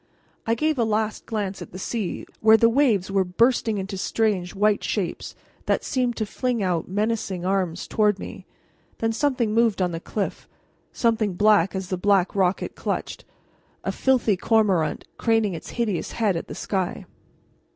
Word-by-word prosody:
I 230 - +2
gave 305 +2 0
a - - +4
last 215 -1 -1
glance 200 -3 -3
at - - -9
the - - -6
sea, 205 0 -3
where 220 0 +6
the 230 +1 +5
waves 230 -8 +2
were 195 -1 +3
bursting 225 +3 +2
into 195 0 -4
strange 200 -4 0
white 210 +1 +2
shapes 185 -6 -3 0.3
that - - +1
seemed 250 -3 0
to 220 - -1
fling 240 0 -1
out 175 -3 0
menacing 200 -2 -2
arms 185 -3 -1
toward 210 -2 +2
me. - - -9 0.5
Then 225 0 0
something 240 -3 0
moved 225 -3 +3
on 180 -1 +1
the 165 - -4
cliff, 200 +3 -4 0.4
something 225 -4 +1
black 205 -2 +4
as 190 -1 -4
the 185 - -1
black 195 0 +2
rock 190 -1 +2
it - - -6
clutched - - -4 0.6
a - - -1
filthy 255 -6 +2
cormorant, 195 -5 +1
craning 225 -4 +2
its 165 - -7
hideous 215 -7 -1
head 210 -5 +1
at 165 - -4
the - - -7
sky. 190 -3 -2
210 Hz, 170 wpm, -24 LUFS, 190-225 Hz, 0.6 s, where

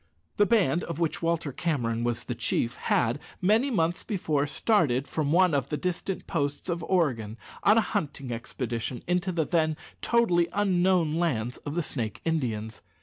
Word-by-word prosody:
The 205 - +4
band 180 - +3
of 170 -1 -5
which 165 -2 -1
Walter 165 -3 0
Cameron 120 -7 -1
was 120 -1 -1
the 125 - -3
chief 120 0 0
had, 120 +4 0 0.2
many 220 +9 +3
months 175 -7 +1
before, 155 -8 -1
started 145 - +2
from 150 -2 -1
one 180 0 +4
of 140 -2 0
the 150 - -1
distant 180 +4 -3
posts 145 +1 -2
of 170 -1 -1
Oregon 120 - 0 0.2
on 210 +3 +5
a - - +6
hunting 140 - -3
expedition 120 +1 -4
into 180 +1 0
the 165 -3 0
then 155 -2 +1 0.2
totally 180 -8 +3
unknown 180 -5 +2
lands 125 -9 -1
of 145 +1 -6
the 175 - 0
Snake 115 -7 -3
Indians. 115 -9 -2
160 Hz, 165 wpm, -27 LUFS, 125-180 Hz, 0.2 s, a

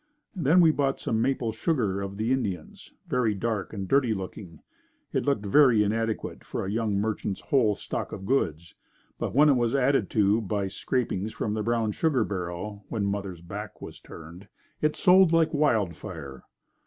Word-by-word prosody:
Then 170 +1 +4
we 165 -2 +6
bought 140 -2 0
some 110 0 -1
maple 125 -3 0
sugar 110 - -1
of 100 0 -5
the 110 +3 -1
Indians 100 -11 -3 0.2
very 115 -4 +1
dark 110 0 -2
and 100 -3 -5
dirty 125 -2 +2
looking. 95 -3 -8 0.5
It - - -1
looked 125 -8 +1
very 120 -1 +5
inadequate 110 +1 -2
for - - -4
a 95 - -3
young 110 -1 0
merchant's 105 -1 -2
whole 120 -8 +2
stock - - -5
of 95 - -7
goods, 85 - -1 0.5
but - - -3
when 150 +3 +6
it 145 - +6
was 120 -1 +1
added 135 -6 +2
to 105 +1 +2
by 100 -1 -2
scrapings 110 -2 -2
from 105 - -2
the 110 - -1
brown 115 0 0
sugar 135 0 +1
barrel, 100 +2 -5
when 105 -4 -1
mother's 100 -4 -3
back 105 +4 -8
was - - -9
turned, 85 +5 -12 0.3
it 150 0 +1
sold 185 -2 +5
like 165 -1 +3
wild 115 - +2
fire. 75 -9 -9
110 Hz, 175 wpm, -27 LUFS, 100-130 Hz, 0.5 s, we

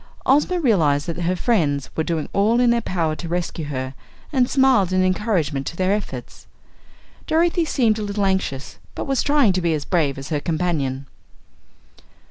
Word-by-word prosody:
Ozma 295 +7 +3
realized 160 - +2
that 170 -1 -4
her 175 +2 0
friends 155 - 0
were 160 - 0
doing 160 -2 -2
all 215 +4 +3
in 245 -1 +4
their 235 0 +1
power 165 -6 -1
to 170 - -7
rescue 170 -2 -3
her 130 -2 -4 0.4
and 255 -3 +2
smiled 260 -9 +3
an 185 0 +2
encouragement 185 -8 0
to - - -5
their 185 +2 +1
efforts. 210 0 -6 0.8
Dorothy 335 +1 +2
seemed 230 -8 +1
a - - -3
little 205 0 -1
anxious 190 -8 -2 0.2
but - - -4
was 270 -3 0
trying 285 -9 +3
to 185 - -1
be 170 -2 +1
as 150 - -4
brave 150 -6 0
as 135 0 -7
her 150 - 0
companion. 150 -5 -2
185 Hz, 175 wpm, -21 LUFS, 155-235 Hz, 0.8 s, in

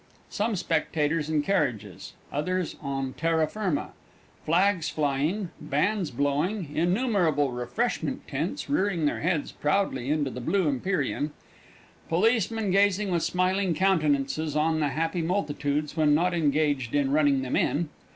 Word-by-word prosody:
Some 215 +1 0
spectators 155 -3 0
in 155 -2 +1
carriages; 110 - -2 0.2
others 180 +4 -1
on 135 -1 -3
terra 165 -1 +1
firma; 185 -2 -2 0.5
flags 180 +1 +2
flying; 155 +6 -1
bands 155 +5 0
blowing; 145 - -1
innumerable 175 - +2
refreshment 125 - -2
tents - - -3
rearing 195 - +1
their 145 - 0
heads 165 -3 0
proudly 150 -6 0
into 145 -3 0
the 125 - -6
blue 185 +7 +1
Empyrean; 150 0 -1 0.8
policemen 220 +3 +1
gazing 200 0 +2
with 170 -1 +1
smiling 185 0 +1
countenances 155 -5 +1
on 160 +1 +2
the 150 -2 +1
happy 165 +4 -1
multitudes 150 -5 -1
when 150 -2 +4
not 175 +3 +2
engaged 145 -5 +1
in 140 -2 +2
running 145 -2 +3
them 130 - -2
in. 145 +4 +1
160 Hz, 130 wpm, -27 LUFS, 145-185 Hz, 0.8 s, when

